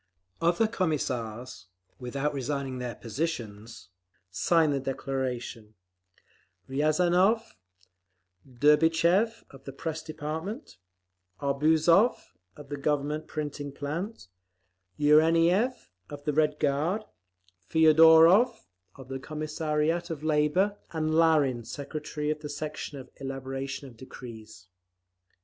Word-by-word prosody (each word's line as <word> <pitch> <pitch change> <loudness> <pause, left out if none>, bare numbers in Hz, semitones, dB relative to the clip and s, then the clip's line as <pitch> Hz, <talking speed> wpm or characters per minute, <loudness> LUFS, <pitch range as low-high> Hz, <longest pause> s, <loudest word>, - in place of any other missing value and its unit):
Other 170 +6 +3
Commissars, 125 - -3 0.3
without 135 +4 -2
resigning 135 -1 -3
their 120 -2 -4
positions, 115 - -5 0.4
signed 160 - +2
the 140 - 0
declaration—Riazanov, 130 - -2 1.0
Derbychev 165 - +3
of 135 -1 -15
the 135 - -6
Press 160 +3 -5
Department, 155 - -6 0.6
Arbuzov, 160 - +3 0.4
of 145 -2 -12
the 145 - -4
Government 150 +2 -1
Printing 145 -2 -5
plant, 150 - -5 0.7
Yureniev, 165 - +3 0.2
of 145 0 -9
the 150 0 -1
Red 150 0 +2
Guard, 155 +10 0 0.7
Feodorov, 160 +8 +6 0.4
of 135 -2 -12
the 135 0 -5
Commissariat 155 +3 -2
of 155 -3 -5
Labour, 155 +7 +1
and 155 -1 -1
Larin, 155 -7 +3
secretary 150 +4 -4
of 155 - -3
the 150 -1 -7
Section 150 0 -5
of 130 - -11
Elaboration 135 0 -5
of 120 -3 -15
Decrees. 110 -5 -11
150 Hz, 95 wpm, -28 LUFS, 135-160 Hz, 1.0 s, Feodorov